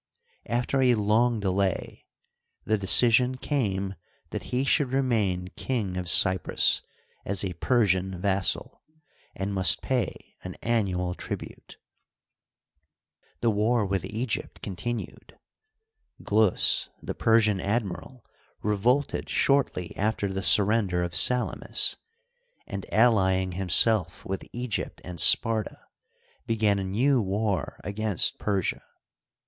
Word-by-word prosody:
After 125 +3 0
a 125 -2 +4
long 110 +2 +1
delay 95 -1 -2 0.6
the 110 - +1
decision 120 +5 +3
came 100 -9 -2 0.4
that - - -5
he 130 +2 -1
should 135 -1 +1
remain 105 -9 0
King 105 -4 -4
of 90 -1 -2
Cyprus 95 -1 +3 0.4
as 100 0 0
a 90 - -4
Persian 95 -2 0
vassal, 95 0 0 0.5
and 100 +1 -4
must 95 -4 +3
pay - - -3
an - - -7
annual 95 -6 -1
tribute. - - -8 1.6
The 115 - +2
war 110 +2 +1
with 95 -1 -2
Egypt 115 +1 -4
continued. 115 +5 -6 0.9
Glus, 105 -2 +2
the - - -4
Persian 110 -3 +2
admiral, 105 +4 -4 0.4
revolted 115 +7 0
shortly 135 -11 0
after 100 -1 -1
the 95 - -3
surrender 100 -1 +3
of 85 0 -4
Salamis, 125 -1 +3 0.7
and, 100 -1 -8
allying 95 -5 +2
himself 95 +3 +1
with 95 0 -5
Egypt 120 -2 -4
and 90 -2 -8
Sparta, 110 -2 +3 0.7
began 110 -3 +1
a - - -3
new 120 +8 +1
war 100 -1 -2
against 105 -1 -1
Persia. 100 -4 -2
105 Hz, 110 wpm, -26 LUFS, 95-120 Hz, 1.6 s, a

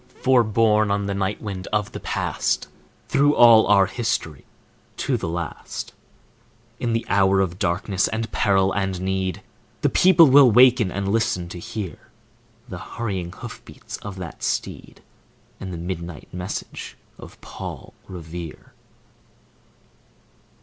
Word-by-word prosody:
For, 130 -2 +5
borne 110 -1 +2
on 100 0 0
the 100 - -2
night 100 +2 -2
wind 100 -3 -5
of 105 -1 -1
the - - -7
Past, - - -2 0.4
Through 145 +1 +3
all 115 -2 +7
our 100 -1 +5
history, 95 - -3 0.5
to - - 0
the - - -3
last, 85 -1 -5 0.9
In 115 -2 -1
the 115 0 -1
hour 95 -1 +3
of 95 -1 -1
darkness 95 +1 0
and 110 0 -3
peril 95 -2 +2
and 95 -2 -2
need, 95 +1 -2 0.4
The - - +3
people 180 -2 +6
will 135 -2 +7
waken 120 -3 +5
and 100 +1 -2
listen 110 -5 0
to 85 - -8
hear 100 +1 -7 0.6
The - - -7
hurrying 95 -7 -4
hoof - - -9
beats - - -9
of 100 -2 -8
that 90 -4 -8
steed, - - -4 0.6
And 95 -1 -6
the 85 - -5
midnight 85 -1 -7
message 90 +1 -6 0.2
of - - -13
Paul - - -9
Revere. 85 -2 -9
100 Hz, 135 wpm, -23 LUFS, 90-115 Hz, 0.9 s, all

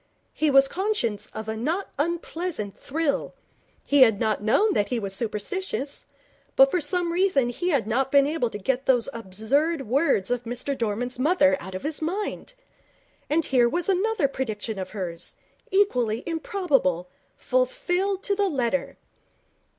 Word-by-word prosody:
He 310 - +1
was 275 -1 +6
conscious 270 - -1
of 220 0 -8
a 220 - -2
not 320 - -2
unpleasant 335 - -2
thrill. 300 0 -2 0.5
He 285 -1 +4
had 225 -5 +6
not 215 -3 0
known 275 - +3
that 205 -1 +1
he 250 - 0
was 200 -4 -4
superstitious, 250 - -3 0.5
but 270 0 +6
for 360 - +1
some 345 +3 +1
reason 350 -9 +2
he 350 +9 -2
had 275 - +2
not 255 +5 0
been 280 -1 +6
able 290 -5 0
to 205 - -6
get 255 +6 -2
those 245 -3 +3
absurd 235 - 0
words 245 - +2
of 245 -1 0
Mr 245 +4 -2
Dorman's 240 +2 -3
mother 285 -1 +4
out 190 0 -8
of 185 - -6
his 305 +1 -3
mind. 405 +8 -3 0.7
And 310 +1 +2
here 245 -3 +3
was 350 +8 -1
another 390 -3 +2
prediction 220 -5 -4
of 185 -1 -5
hers, 180 -5 -6 0.3
equally 250 - +1
improbable, 325 - 0 0.3
fulfilled 400 -7 0
to 400 - 0
the 400 -1 +1
letter. 265 -3 -1
275 Hz, 155 wpm, -25 LUFS, 225-350 Hz, 0.7 s, was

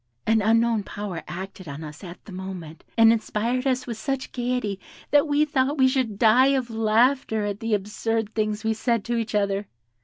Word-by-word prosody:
An 220 0 +3
unknown 225 +1 +3
power 200 -4 -6
acted 185 +2 -7
on 145 +2 -7
us 150 +2 -10
at 175 -1 -10
the 210 - -11
moment, 185 -4 -7
and 225 0 +7
inspired 230 +3 -1
us 255 -1 0
with 235 -3 -5
such 270 +3 -3
gaiety 245 -5 -2 0.3
that 290 +1 +5
we 295 +1 +3
thought 285 0 0
we 260 -1 +5
should 255 -6 0
die 235 +5 +5
of 245 -3 -3
laughter 225 0 +2
at 205 0 -3
the 225 -2 +1
absurd 215 +2 -2
things 215 -1 -1
we 220 0 +1
said 230 -1 0
to 240 - -1
each 225 -1 -2
other. 200 -1 0
220 Hz, 190 wpm, -24 LUFS, 200-250 Hz, 0.3 s, and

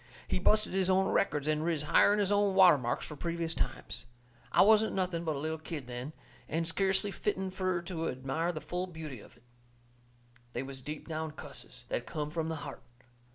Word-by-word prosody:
He - - 0
busted 215 +3 +3
his 190 -1 +2
own 190 +1 +4
records 150 -6 +1
and 155 0 +1
riz 165 -3 0
higher'n 205 +6 +5
his 205 -1 +1
own 205 -1 +3
water 185 -6 +8
marks 120 -1 -2
for 150 - -7
previous 165 +1 -2
times. - - -4 0.4
I - - +6
wasn't 220 +1 +5
nothing 180 -3 0
but 160 -3 -1
a - - -3
little 160 +2 -2
kid 155 -3 -6
then, 125 +4 -6 0.4
and 165 +1 0
skeercly 190 +3 +1
fitten 190 -2 -1
fur 185 -2 -1
to 170 -2 -2
admire 135 +7 -1
the 155 -3 -6
full 180 +1 -3
beauty 160 -7 -7
of 115 - -16
it. 120 - -25 1.1
They - - -2
was 135 -1 -8
deep 150 +3 -6
down 160 -1 -3
cusses, - - -10
that - - -2
come 150 -2 -3
from 160 0 -1
the 160 - -2
heart. 140 - -7
165 Hz, 200 wpm, -32 LUFS, 150-190 Hz, 1.1 s, water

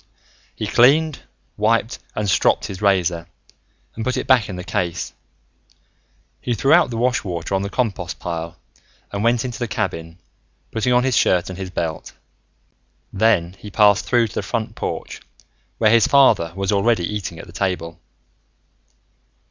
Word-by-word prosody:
He - - -4
cleaned, 145 +5 +4 0.4
wiped 115 +3 +1 0.2
and 105 - -1
stropped 95 - +2
his 95 0 -7
razor 90 -4 +1 0.7
and 110 - -5
put 130 +2 -1
it - - -2
back 125 -5 +3
in 95 - -5
the 90 - -6
case. 90 -2 -3 1.3
He 120 - -1
threw 135 +6 +3
out 175 -4 +5
the 115 - -4
wash 125 0 +1
water 85 -1 -4
on 95 - +1
the 100 - -3
compost 100 -7 -2
pile 85 -1 -5 0.5
and 100 +1 -3
went 120 +2 +2
into 125 -2 -5
the 120 - -2
cabin, 90 -8 -4 0.5
putting 115 +2 0
on 125 0 +4
his 130 -2 +1
shirt 90 0 +2
and 95 - -8
his 95 -1 -5
belt. 85 -3 -4 1.0
Then 95 -5 +2
he 105 - -9
passed 100 -1 +4
through 120 -2 +2
to - - -13
the - - -2
front 115 -2 -3
porch, - - -5 0.6
where 110 -2 +4
his 115 -1 +5
father 115 -12 +4
was 95 0 -1
already 105 -2 +2
eating 100 -4 -4
at - - -9
the 85 - -14
table. 85 -2 -3
105 Hz, 165 wpm, -21 LUFS, 90-120 Hz, 1.3 s, out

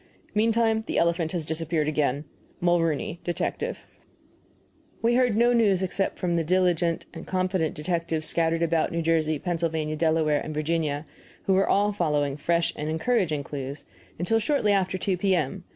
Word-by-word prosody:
Meantime, 225 +1 +2
the - - -2
elephant 170 -1 +1
has 170 -4 -3
disappeared 160 -1 -1
again. 150 -1 0 0.3
MULROONEY, 170 -2 +1
Detective. 175 - -3 1.2
We 235 +1 +3
heard 245 -3 +3
no 240 +1 +4
news 205 -6 +3
except 195 +1 -1
from 175 -2 -1
the 165 - +1
diligent 175 -1 +1
and - - -9
confident 185 -3 0
detectives 165 0 -2
scattered 165 0 +1
about 165 +2 +1
New 170 -1 -1
Jersey, 160 -1 +1
Pennsylvania, 160 -2 -2
Delaware, 155 -1 +2
and 155 - -6
Virginia 155 -1 -1 0.4
who 195 - +2
were 195 +1 +3
all 205 +1 +3
following 150 -7 0
fresh 170 +3 0
and 150 +1 -4
encouraging 160 -3 0
clues 140 0 -6 0.3
until 180 +7 +1
shortly 225 -3 +1
after 190 -2 +1
2 185 0 -1
P.M. 180 -2 0
170 Hz, 150 wpm, -26 LUFS, 155-190 Hz, 1.2 s, no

